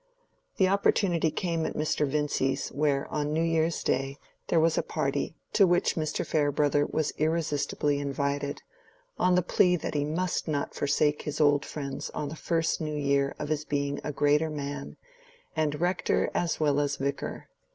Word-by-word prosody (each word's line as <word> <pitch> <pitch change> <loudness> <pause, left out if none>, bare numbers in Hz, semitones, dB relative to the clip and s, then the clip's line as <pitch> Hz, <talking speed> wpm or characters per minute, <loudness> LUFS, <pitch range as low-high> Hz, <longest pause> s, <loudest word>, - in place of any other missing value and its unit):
The 190 - +4
opportunity 185 -4 +2
came 165 0 -1
at - - -3
Mr. 150 -1 0
Vincy's, 135 -2 0
where, 140 -1 0
on 150 0 -1
New 160 +2 +1
Year's 165 0 +1
Day, 135 +1 0 0.3
there 165 - +3
was 160 0 +3
a - - +2
party, - - -2 0.2
to 195 - +6
which 175 0 +2
Mr. 155 -2 -1
Farebrother 145 -1 +2
was 155 -1 -1
irresistibly 150 -2 0
invited, 140 0 -2 0.6
on 180 0 +4
the 180 - +3
plea 180 +1 +3
that 170 - -4
he 145 -1 +1
must 170 +5 -1
not 145 -2 -2
forsake 145 +1 +1
his 150 - -4
old 145 -1 +4
friends 140 -3 -5
on 150 -2 -2
the 155 - -6
first 165 0 0
new 155 -1 -2
year 140 -1 +1
of - - -5
his 155 -1 0
being 140 -1 -1
a 150 - -2
greater 150 +2 +2
man, 145 -2 -5 0.6
and 150 -2 0
Rector 175 +2 +1
as 170 -1 0
well 145 -2 +2
as 145 -1 0
Vicar. 140 +1 -3
150 Hz, 170 wpm, -28 LUFS, 145-160 Hz, 0.6 s, to